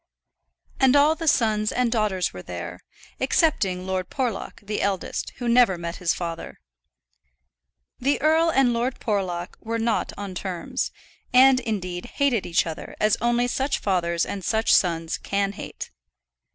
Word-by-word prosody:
And 265 0 +5
all 290 +2 +6
the 325 0 -5
sons 215 -6 +2
and 250 -2 +1
daughters 210 -6 0
were 90 - -7
there, 90 0 -7 0.4
excepting 200 - +1
Lord 185 -1 -2
Porlock, 245 -7 -3
the 210 +1 -2
eldest, 195 -2 -2
who 245 - -4
never 235 -6 +4
met 170 0 -5
his 175 -2 +1
father. 170 -2 -5 1.4
The 275 +3 +1
earl 320 +2 +3
and 270 -5 +3
Lord 240 +3 -1
Porlock 185 -5 -2
were 230 +1 -3
not 230 0 0
on 200 -2 -5
terms, 180 -1 -3 0.4
and 260 +1 +7
indeed 185 -7 -4
hated 270 -7 +1
each 170 - +2
other 160 -2 -7
as 215 -1 +3
only 240 +1 +2
such 270 +3 0
fathers 170 -3 0
and 195 -2 -5
such 220 +4 +2
sons 165 -2 +1
can 200 0 -1
hate. 195 - -8
210 Hz, 150 wpm, -24 LUFS, 180-250 Hz, 1.4 s, and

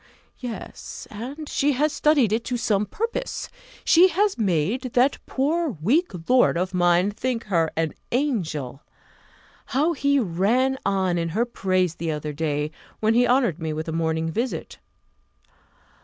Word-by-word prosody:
Yes, 245 -3 -7
and 265 +8 -7
she 285 +1 +1
has 295 +4 +1
studied 285 -10 +3
it 230 +1 0
to 250 - -1
some 210 -3 +1
purpose; 465 - -3 0.4
she 345 +3 +7
has 395 +3 +1
made 215 - 0
that 255 +3 +3
poor 295 - 0
weak 280 - +2 0.2
lord 250 -8 +4
of 185 +2 -1
mine 175 +2 +3
think 235 +2 -2
her 170 -6 +1
an 160 -1 0 0.2
angel. 170 - -1 1.0
How 315 +5 +3
he 280 -1 +2
ran 235 +7 +1
on 190 -3 +1
in 165 0 -1
her 220 +8 +1
praise 185 -7 0
the 165 -1 -4
other 150 -1 -3
day, 150 0 -1 0.3
when 220 +1 +2
he 245 +1 +4
honoured 240 - +2
me 160 -1 -3
with 155 +1 -4
a - - -2
morning 160 0 -1
visit! 235 +9 -3
220 Hz, 150 wpm, -24 LUFS, 170-265 Hz, 1.0 s, she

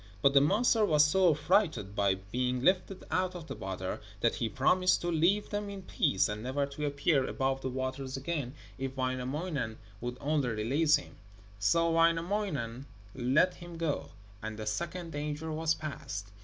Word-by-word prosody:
But 140 - +5
the 140 - +7
monster 215 - +3
was 150 -6 +5
so 180 +4 +4
affrighted 155 - +1
by 100 -2 +3
being 125 +7 -2
lifted 185 +2 +2
out 185 0 0
of 170 -3 -7
the - - -6
water 95 -1 -4 0.2
that 115 - +3
he 115 - -1
promised 185 +8 +3
to 175 - -1
leave 175 +6 +2
them 205 0 -2
in 200 -1 -7
peace, 95 - +2
and 105 0 -4
never 130 +4 -1
to 140 +1 -4
appear 145 0 +2
above 135 0 -1
the 130 - -2
waters 130 +1 -3
again 140 -2 -3 0.2
if 135 0 -4
Wainamoinen 130 0 -2 0.2
would 125 +1 -4
only 145 -2 0
release 135 +8 +3
him. 145 - -6 0.4
So 165 +11 +3
Wainamoinen 165 - +1 0.3
let 135 +8 +3
him 175 -1 -10
go, 165 -3 -2 0.3
and 110 0 -5
the 110 - -5
second 170 +9 -3
danger 150 +2 -3
was 160 +1 +1
past. 105 -9 -6
145 Hz, 170 wpm, -31 LUFS, 125-170 Hz, 0.4 s, the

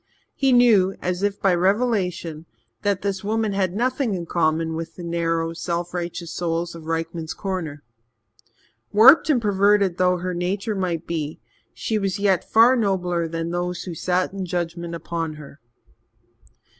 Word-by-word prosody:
He 270 -1 +1
knew, 220 -6 +5
as 180 0 -2
if 205 0 -1
by 195 -2 +3
revelation, 180 -5 0 0.3
that 200 -2 0
this 195 -1 -2
woman 215 0 0
had 190 -2 0
nothing 250 -1 0
in 175 -2 -4
common 160 -1 0
with 165 0 -6
the 175 - -9
narrow, 165 -1 -1
self 170 +1 -3
righteous 170 -1 -4
souls 170 0 -2
of 165 -1 -10
Rykman's 165 0 -3
Corner. 165 -7 -4 1.1
Warped 255 +11 +7
and 280 -5 +4
perverted 200 -3 +2
though 180 0 +3
her 180 +1 -3
nature 190 +5 -2
might 180 -4 -2
be, 155 -3 -4 0.3
she 220 -1 -2
was 195 -1 -1
yet 200 -3 +2
far 230 +3 +6
nobler 180 -6 0
than 165 +1 -4
those 175 +1 -3
who 180 - -6
sat 180 +3 -1
in 195 -1 -4
judgement 170 -1 -3
upon 165 -2 -4
her. 150 -1 -12
180 Hz, 155 wpm, -23 LUFS, 165-200 Hz, 1.1 s, Warped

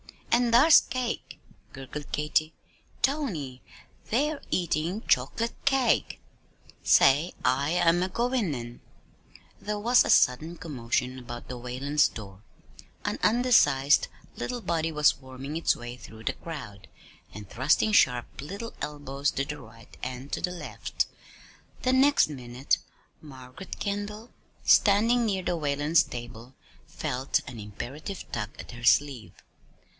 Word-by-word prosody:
"An' 240 0 +3
thar's 280 +7 +8
cake," 250 -2 -4 0.3
gurgled 135 +2 -8
Katy. 155 +1 0 0.5
"Tony, 180 - -1 0.5
they're 290 +6 0
eatin' 175 +3 -1
choc'late 145 - +1
cake. 270 -2 +2 0.6
Say, 145 +6 +5
I 135 +3 +2
am 175 0 +3
a 185 - 0
goin' 235 - 0
in!" 120 0 -8 0.8
There 210 0 -3
was 235 +4 +4
a - - -4
sudden 155 +7 +3
commotion 130 -4 -2
about 120 -1 -8
the 125 -1 -6
Whalens' 135 +5 +1
door. 100 -3 -10 0.6
An - - -2
undersized 210 - +4 0.3
little 245 -1 -4
body 165 -4 -1
was 150 -2 +3
worming 130 +3 -7
its 165 - +2
way 120 0 -8
through 110 -2 -12
the - - -1
crowd, 105 - -9 0.4
and 105 -1 -9
thrusting 135 - +2
sharp 125 -11 +2
little 200 +9 -7
elbows 145 -1 -2
to 140 - -2
the 150 +1 -6
right 115 -4 -15
and 130 +2 -6
to - - -2
the 180 - 0
left. 180 - -3 0.8
The 255 - +2
next 275 - +4
minute, 125 -1 -1 0.4
Margaret 130 +4 -10
Kendall, 210 +3 -4 0.3
standing 230 +4 +4
near 190 -3 -1
the 175 - 0
Whalens' 145 +1 +2
table, 120 +1 -8 0.3
felt 135 -3 -1
an 120 -2 -8
imperative 135 - -7
tug 105 - -3
at - - -9
her 120 -1 -11
sleeve. 130 -2 +2
150 Hz, 130 wpm, -27 LUFS, 125-205 Hz, 0.8 s, thar's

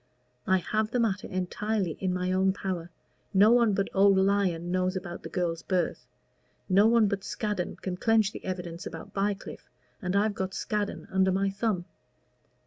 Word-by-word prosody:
I 190 - +4
have 215 +4 -1
the 245 - -1
matter 205 -4 0
entirely 190 +1 -1
in 190 -1 0
my 180 0 -1
own 190 +1 +3
power. 185 -4 -4 0.5
No 205 +3 +7
one 235 -3 +4
but 195 - 0
old 195 0 +5
Lyon 190 -3 +1
knows 185 0 0
about 175 -2 -5
the - - -8
girl's 170 -2 -1
birth. 185 -2 -1 0.6
No 200 +3 +5
one 230 -2 +5
but 195 -1 -2
Scaddon 210 -4 -3
can 180 -1 -5
clench 220 -1 +3
the - - -9
evidence 180 -2 -5
about 165 - -9
Bycliffe, 200 0 -3 0.3
and 185 -1 -2
I've 205 +1 +2
got 190 -1 -4
Scaddon 210 -1 -3
under 190 0 +3
my 195 +1 +1
thumb. 195 -3 -1
190 Hz, 170 wpm, -28 LUFS, 180-205 Hz, 0.6 s, No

